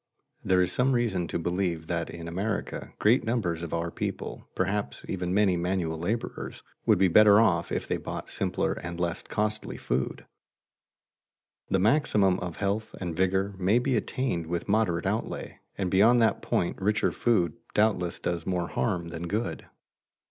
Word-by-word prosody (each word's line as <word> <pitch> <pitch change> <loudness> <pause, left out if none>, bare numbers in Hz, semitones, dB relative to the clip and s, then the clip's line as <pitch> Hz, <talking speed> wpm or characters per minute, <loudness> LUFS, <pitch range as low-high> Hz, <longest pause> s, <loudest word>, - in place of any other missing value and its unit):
There 90 -1 +3
is 90 - -1
some 130 +2 +2
reason 105 -8 0
to - - -2
believe 85 -1 -1
that 85 +1 -2
in 85 -1 -7
America 100 +5 -3
great 115 +5 +4
numbers 105 -9 -1
of 85 - -5
our 85 0 -2
people, - - -5
perhaps 100 +2 -2
even 90 -1 -2
many 100 -1 +3
manual 85 -2 -1
laborers, 110 +7 -4 0.2
would - - +6
be 95 +1 +4
better 105 +3 +7
off 115 - +2
if - - -2
they - - 0
bought - - -6
simpler - - -1
and 85 +1 -6
less 85 -1 -1
costly 105 0 -2
food. 65 +1 -2 1.4
The - - +3
maximum 100 -4 +3
of 90 -2 -5
health 105 +2 -2
and 85 -3 -4
vigor 95 +2 +1
may 95 +5 +3
be 125 +1 +1
attained 110 - -1
with 85 0 -3
moderate 100 -5 +1
outlay, 105 +4 -3 0.2
and 95 -3 -1
beyond 110 +6 +5
that 115 -1 +2
point 85 - -1
richer 105 +3 +2
food 90 -10 +1 0.2
doubtless 100 -5 +2
does 85 -2 -2
more 90 -2 -1
harm 90 -6 -1
than 85 0 -5
good. 110 +6 -3
95 Hz, 165 wpm, -28 LUFS, 85-110 Hz, 1.4 s, better